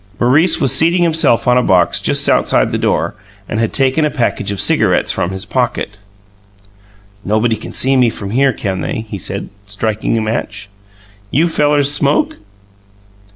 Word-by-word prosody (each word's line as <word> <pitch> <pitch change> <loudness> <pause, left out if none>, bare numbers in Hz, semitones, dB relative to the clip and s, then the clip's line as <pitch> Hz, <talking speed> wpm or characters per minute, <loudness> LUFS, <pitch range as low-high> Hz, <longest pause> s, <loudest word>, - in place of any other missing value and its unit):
Maurice 145 +9 +3
was 135 - +4
seating 170 +2 +3
himself 160 -9 +2
on 125 0 +4
a - - +2
box 90 -7 +2
just - - +1
outside - - +2
the - - -2
door - - -1 0.3
and 110 - -3
had 115 -1 0
taken 135 +3 +1
a 150 - +1
package 120 -8 -2
of 100 - -5
cigarettes - - +2
from 85 - -2
his 95 +2 -5
pocket. 115 -4 -3 1.2
"Nobody 110 +3 0
can - - -9
see 135 +1 +1
me 125 -2 +3
from 100 -2 -7
here, 135 +3 +2
can 95 -5 -4
they?" 110 - -4
he 100 -2 -7
said, - - -5 0.2
striking 110 +2 -2
a - - 0
match. 105 -2 -4 0.6
"You 155 +10 +2
fellers 145 -3 +1
smoke?" 145 0 0
120 Hz, 165 wpm, -15 LUFS, 105-140 Hz, 1.2 s, was